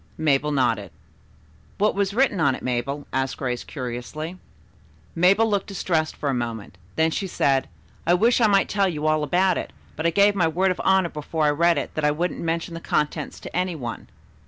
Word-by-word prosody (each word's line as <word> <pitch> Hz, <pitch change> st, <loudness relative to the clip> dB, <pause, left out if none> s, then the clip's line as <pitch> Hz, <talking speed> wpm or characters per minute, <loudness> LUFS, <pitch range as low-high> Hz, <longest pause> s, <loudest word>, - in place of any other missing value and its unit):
Mabel 150 Hz, -1 st, +1 dB
nodded. 120 Hz, -8 st, +1 dB, 0.9 s
"What 210 Hz, +2 st, +2 dB
was 200 Hz, -1 st, 0 dB
written 250 Hz, -6 st, +2 dB
on 140 Hz, -5 st, +3 dB
it, -, -, -10 dB
Mabel?" 130 Hz, +4 st, -2 dB
asked 135 Hz, 0 st, -1 dB
Grace 125 Hz, -2 st, -3 dB
curiously. 145 Hz, +7 st, -6 dB, 0.7 s
Mabel 195 Hz, +6 st, +4 dB
looked 200 Hz, -3 st, 0 dB
distressed 170 Hz, -5 st, -1 dB
for 145 Hz, -, -4 dB
a 140 Hz, -, +1 dB
moment 115 Hz, -6 st, -4 dB, 0.2 s
then 160 Hz, 0 st, +2 dB
she 195 Hz, -, -2 dB
said, 135 Hz, -6 st, +1 dB, 0.4 s
"I 175 Hz, -, +5 dB
wish 235 Hz, +6 st, +3 dB
I 225 Hz, -, +6 dB
might 200 Hz, -1 st, +3 dB
tell 200 Hz, -1 st, +1 dB
you 155 Hz, -3 st, -4 dB
all 155 Hz, 0 st, +2 dB
about 180 Hz, +4 st, +2 dB
it, -, -, -6 dB, 0.2 s
but 160 Hz, +2 st, 0 dB
I -, -, +4 dB
gave 200 Hz, +4 st, +4 dB
my 180 Hz, -5 st, +2 dB
word 185 Hz, +4 st, +1 dB
of 185 Hz, -, -3 dB
honor 190 Hz, -2 st, +3 dB
before 155 Hz, +1 st, -2 dB
I 150 Hz, -, +4 dB
read 170 Hz, +3 st, +3 dB
it -, -, -3 dB
that 155 Hz, -, -3 dB
I 150 Hz, -, +4 dB
wouldn't 170 Hz, +4 st, -2 dB
mention 165 Hz, 0 st, -2 dB
the 165 Hz, -, -5 dB
contents 150 Hz, -1 st, -2 dB
to -, -, -9 dB
any 180 Hz, -1 st, 0 dB
one." 120 Hz, -6 st, -6 dB
160 Hz, 205 wpm, -24 LUFS, 140-185 Hz, 0.9 s, I